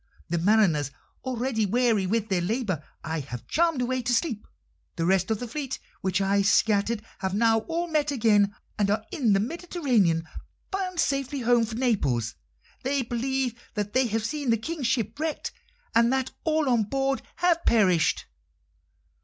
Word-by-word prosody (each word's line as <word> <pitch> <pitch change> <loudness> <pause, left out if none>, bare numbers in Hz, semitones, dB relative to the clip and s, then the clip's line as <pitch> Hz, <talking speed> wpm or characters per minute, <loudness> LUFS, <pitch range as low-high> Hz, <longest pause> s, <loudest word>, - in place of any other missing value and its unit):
The 170 0 0
mariners, 175 - +3 0.3
already 245 -4 -1
weary 225 -3 +2
with 220 +2 0
their 185 -3 +1
labour, 190 - -1 0.2
I 160 0 -2
have 125 -4 -7
charmed 330 -6 +1
away 255 +1 -1
to 245 0 +1
sleep. 230 -5 -1 0.5
The 165 - -1
rest 190 +2 +2
of 220 -2 0
the 245 - -4
fleet 270 +2 -4 0.2
which 190 0 0
I 200 +1 +2
scattered 210 +2 +2 0.2
have 190 -1 -2
now 225 +1 +4
all 335 +1 -1
met 305 -3 +1
again, 210 -6 +3 0.2
and 200 -1 +2
are 210 - 0
in 265 - +2
the 195 - +3
Mediterranean, 240 - 0 0.4
bound 370 -2 -2
sadly 275 -1 0
home 240 -1 +3
for 220 0 -6
Naples. 165 - 0 0.5
They 270 0 0
believe 250 +1 -1 0.2
that 210 -1 -2
they 260 0 +3
have 220 0 -1
seen 285 +1 -2
the 230 - +4
King's 295 +3 -3
ship 235 0 -1
wrecked, 315 -1 -2 0.4
and 235 +1 +4
that 265 -1 0
all 315 -2 +2
on 235 -4 +3
board 270 +4 0
have 345 -1 +2
perished." 185 -8 +3
230 Hz, 165 wpm, -26 LUFS, 200-270 Hz, 0.5 s, now